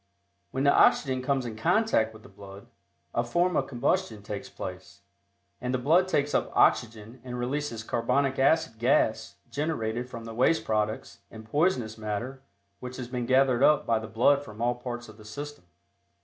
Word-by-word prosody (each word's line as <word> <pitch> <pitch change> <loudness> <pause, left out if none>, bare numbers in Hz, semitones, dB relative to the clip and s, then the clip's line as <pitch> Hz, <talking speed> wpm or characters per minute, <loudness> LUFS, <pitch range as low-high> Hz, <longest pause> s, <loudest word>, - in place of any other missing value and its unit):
When 130 - -2
the 140 - +5
oxygen 130 -3 +4
comes 130 0 0
in 115 -2 -5
contact 115 - +2
with 110 0 -15
the - - -13
blood, 100 0 -12 0.5
a 120 - +1
form 175 +8 +1
of 135 - +1
combustion 115 -4 -1
takes 105 -1 -6
place, 95 +2 -8 0.6
and 125 +1 -1
the - - +2
blood 165 +9 +3
takes 145 -5 0
up - - +1
oxygen 115 +1 +1
and 125 -1 -6
releases 125 -2 -3
carbonic 135 +4 0
acid 135 -5 +2
gas 110 -3 +1 0.2
generated 125 -6 -2
from 115 -2 -8
the 115 - -7
waste 130 +8 +2
products 110 0 -2
and 110 -1 -11
poisonous 125 -5 0
matter 110 +5 -4 0.4
which 125 0 -7
has 125 -2 -6
been 125 -2 -3
gathered 130 -1 +3
up 150 +1 +4
by 115 -1 +2
the 110 - -7
blood 140 +6 +3
from 110 -4 -12
all 120 +1 +1
parts 120 0 -6
of 110 -1 -14
the 110 - -14
system. 145 +2 -8
120 Hz, 175 wpm, -27 LUFS, 110-135 Hz, 0.6 s, the